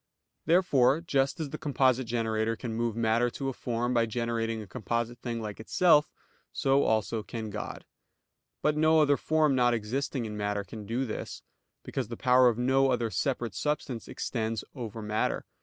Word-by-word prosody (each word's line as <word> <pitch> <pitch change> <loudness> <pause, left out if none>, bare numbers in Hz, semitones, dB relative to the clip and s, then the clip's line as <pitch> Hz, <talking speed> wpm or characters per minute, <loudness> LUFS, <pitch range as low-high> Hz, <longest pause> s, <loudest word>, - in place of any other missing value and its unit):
Therefore 155 -6 +4
just 140 -2 0
as 150 -4 -4
the - - -5
composite 130 -3 +2
generator 115 -1 0
can 115 -1 -5
move 115 -1 -1
matter 115 +1 +2
to 135 +2 -4
a - - -4
form 120 0 -2
by 115 -1 +2
generating 115 -1 -2
a 110 - -7
composite 115 +3 -3
thing 120 -2 -4
like 105 -2 -6
itself; 150 +6 +3 0.4
so 135 +1 +2
also 110 -1 +1
can 110 -1 -6
God. 105 - -6 0.8
But 150 0 +2
no 155 +1 +4
other 145 -2 +4
form 155 -1 +2
not 120 -2 +3
existing 120 +3 -2
in 105 -1 -5
matter 105 -1 -1
can 105 +2 -9
do 120 +4 -1
this; 110 - -6 0.4
because - - -3
the 115 0 -7
power 125 0 +5
of 115 - -2
no 135 +2 +3
other 120 -3 0
separate 120 -6 -1
substance 135 -2 -3
extends 115 -2 -3
over 115 -4 -6
matter. 105 +1 -1
120 Hz, 175 wpm, -29 LUFS, 110-135 Hz, 0.8 s, power